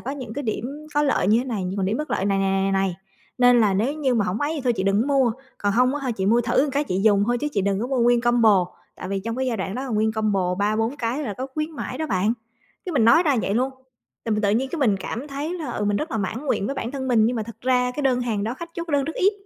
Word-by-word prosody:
có 265 - -5
những 255 -6 -7
cái 285 - -3
điểm 275 +6 -4
có 295 - +3
lợi 275 -9 +1
như 215 +2 +5
thế 245 - -1
này, 225 -7 -3
nhưng 185 +2 -3
mà 195 - 0
điểm 200 +4 0
bất 305 +3 -4
lợi 195 - 0
này, 195 -1 +1
này, 195 0 +1
này, 195 - +1
này, 195 -2 0 0.4
nên 245 -1 +6
là 205 -3 +3
nếu 230 +9 +1
như 280 -5 0
mà 215 -4 +2
hổng 185 +4 -2
ấy 290 +2 0
thì 295 - -3
thôi 245 - +3
chị 190 - -1
đừng 195 +2 +2
có 260 - -3
mua, 270 -4 +3 0.3
còn 205 0 0
hông 250 +4 +3
á, 275 -4 -2
chị 190 -3 -2
mua 230 +4 +4
thử 240 +3 +2
một 295 - -2
cái 285 +2 +1
chị 185 -8 -1
dùng 205 -2 +4
thôi, 240 +1 +1
chứ 295 - -1
chị 200 - +1
đừng 200 0 0
có 240 - -1
mua 265 -1 -1
nguyên 240 0 +4
combo. 225 -6 +4 0.3
Tại - - -7
vì 195 0 -2
trong 230 +4 -4
cái 260 - -1
giai 240 -3 -1
đoạn 190 +1 -3
đó 255 - -3
là - - -6
nguyên 220 -1 +1
combo 200 -5 0
3-4 215 +6 0
cái 245 +3 -2
là 215 -8 -4
có 260 +6 -4
khuyến 310 +1 -2
mãi 310 - -6
đó 315 - -2
bạn, 195 +1 +1 0.5
cái 360 - -3
mình 235 -6 +3
nói 235 +9 +6
ra 290 -7 +2
vậy 200 - -1
luôn. 255 +3 +1 0.5
Tự 225 - -1
tự 200 - +3
nhiên 250 +6 +1
cái 340 - -2
mình 215 -7 +3
cảm 240 +9 -5
thấy 295 +5 -4
là, 310 -8 -5
ừ, 210 - -2
mình 205 0 +1
rất 300 - -3
là 225 - -2
mãn 220 +9 -3
nguyện 205 - 0
với 275 - -2
bản 235 - -4
thân 265 -1 -4
mình, 225 -3 +4
nhưng 240 +1 0
mà 220 - -1
thực 230 +1 -10
ra 250 0 +2
cái 295 - -4
đơn 255 -2 +2
hàng 220 -4 -1
đó, 230 +3 -2
khách 340 +3 -8
chốt 340 0 -5
đơn 285 -2 +2
rất 320 - -3
ít. 395 +3 +3
235 Hz, 320 wpm, -23 LUFS, 205-275 Hz, 0.5 s, nên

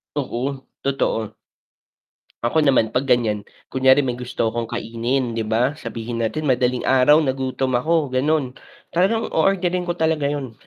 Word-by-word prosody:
Oo, 135 -1 -3 0.2
totoo. 130 -5 -1 1.1
Ako 140 +7 +2
naman 130 -7 +3
pag 135 +2 -1
ganyan, 115 -4 +2 0.3
kunyari 130 +1 +4
may 125 -1 -3
gusto 120 -2 -2
akong 115 -1 -3
kainin 120 +2 -2
'di 115 - -2
ba, 120 +5 +2
sabihin 115 0 -5
natin 135 +8 -2
madaling 125 -2 +1
araw 135 +3 +5
nagutom 130 0 -1
ako, 155 -2 0
ganon, 135 0 +1 0.4
talagang 195 +6 +2
o-orderin 180 +1 +1
ko 175 - -1
talaga 160 -3 +1
yun. 140 -4 -4
130 Hz, 140 wpm, -21 LUFS, 120-150 Hz, 1.1 s, araw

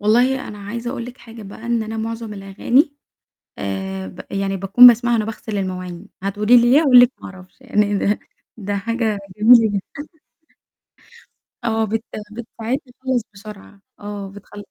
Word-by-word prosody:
والله 245 +5 +2
أنا 210 -1 -9
عايزة 230 +4 -5
أقول 235 -2 -5
لِك 250 +2 -11
حاجة 230 -1 -12
بقى 205 +3 -10
إن 235 -1 0
أنا 220 +1 -6
معظم 225 -1 -5
الأغاني 225 +9 +1 0.6
آآ 95 -1 -4
ب - - -12
يعني 195 0 -2
باكون 195 +6 +7
باسمعها 240 0 +5
وأنا 220 -2 +1
باغسل 215 -1 -5
المواعين 185 -2 -5
هتقولي 210 +4 +3
لي 240 0 +5
ليه؟ 280 +4 +6
هاقول 265 -6 +7
لِك 245 +1 +5
ما - - -7
أعرفش 185 +3 -16
يعني 210 -5 0
ده 205 +2 0 0.4
ده 205 -2 -4
حاجة 225 0 -1 0.2
جميلة 225 +1 +7
جدًا 205 +9 -6 1.6
آه 225 -1 +1
بت 225 +1 -2 0.3
بتساعدني 240 +3 -5
أخلّص 260 -2 0
بسرعة 200 -1 -12 0.2
آه 205 -1 -6
بتخل 205 +1 -12
220 Hz, 160 wpm, -20 LUFS, 200-240 Hz, 1.6 s, باكون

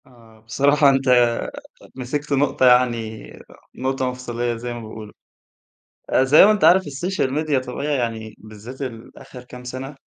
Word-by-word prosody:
آه 115 -3 -20
بصراحة 140 +6 +2
أنت 135 -1 +1 0.9
مسكت 145 +3 -4
نُقطة 140 -1 +1
يعني 120 -4 +1 0.4
نُقطة 130 0 -2
مفصلية 120 -1 -4
زي 120 +1 -6
ما 120 - -7
بيقولوا، 110 -1 -10 1.0
آآ 130 - +3
زي 140 +6 +7
ما 215 - +5
أنت 210 - -1
عارف 190 +2 +6
الSocial 145 +1 -3
Media 155 -3 0
طبيعي 140 +4 -3
يعني 110 -3 -4
بالذات 110 +5 -11
الآخر 125 +1 -9
كام 125 0 -12
سنة، 130 +3 -7
125 Hz, 145 wpm, -21 LUFS, 115-140 Hz, 1.0 s, زي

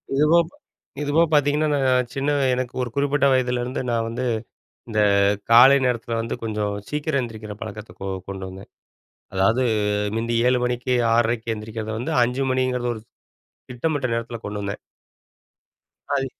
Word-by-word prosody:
இதுபோ 150 +4 +5
ப்ப 175 - -19 0.5
இதுபோக 150 +3 +3
பாத்தீங்கன்னா, 150 +1 +3
நான் 130 -3 +2
சின்ன 140 +1 0 0.2
எனக்கு 125 -1 -2
ஒரு 125 - -2
குறிப்பிட்ட 140 0 +2
வயதிலேருந்து 125 -1 0
நா 120 - +1
வந்து 120 +3 -3 0.6
இந்த 110 -2 0 0.5
காலை 125 +4 +8
நேரத்ல 120 -1 -2
வந்து 115 0 -3
கொஞ்சம் 105 -2 -2 0.2
சீக்கிரம் 150 -1 0
எந்திரிக்கிற 110 -3 -7
பழக்கத்த 105 +2 -8
கொ 95 - -5 0.2
கொண்டு 95 -1 -5
வந்தேன். 95 +1 -11 0.6
அதாவது 110 +7 +2 0.5
முந்தி 115 +1 -1
7 125 0 +2
மணிக்கு, 125 +1 -1 0.2
6:30க்கு- 115 0 +1
எந்திரிக்கிறத 110 0 -6
வந்து, 120 - -3
5 125 +3 0
மணிங்கிறது 125 -1 0
ஒரு 110 - -8 0.7
திட்டமிட்ட 135 +2 -1
நேரத்ல 115 0 -4
கொண்டு 105 0 -4
வந்தேன். 100 0 -4 1.4
அத் 135 -1 0
125 Hz, 140 wpm, -23 LUFS, 115-135 Hz, 1.4 s, காலை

